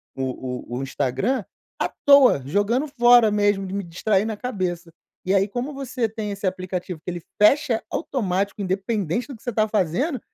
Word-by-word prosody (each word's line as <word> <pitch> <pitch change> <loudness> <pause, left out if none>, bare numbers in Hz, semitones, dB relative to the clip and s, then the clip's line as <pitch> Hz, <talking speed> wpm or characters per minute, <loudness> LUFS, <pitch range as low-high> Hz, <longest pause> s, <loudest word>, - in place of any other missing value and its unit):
o 130 -2 -5
o - - -2
o - - -3
Instagram 140 - -1 0.4
à - - 0 0.2
toa. 280 - +7
Jogando 205 - +1
fora 240 -4 +5
mesmo 205 -1 +1
de 185 - -6
me 200 0 -2
distrair 190 +4 0
na 220 -2 -3
cabeça. 180 -8 -4 0.3
E 185 - +1
aí, 195 +1 +3
como 250 +6 -4
você 255 -3 -2
tem 210 -1 -5
esse 200 0 -3
aplicativo, 185 -2 -4
que 180 - -4
ele 175 - -6 0.2
fecha 255 +1 +4
automático, 200 - -2
independente 195 +2 -1
do 275 - -8
que 225 - -18
você 245 - -2
tá 215 0 +2
fazendo, 220 - 0
205 Hz, 180 wpm, -23 LUFS, 180-240 Hz, 0.4 s, toa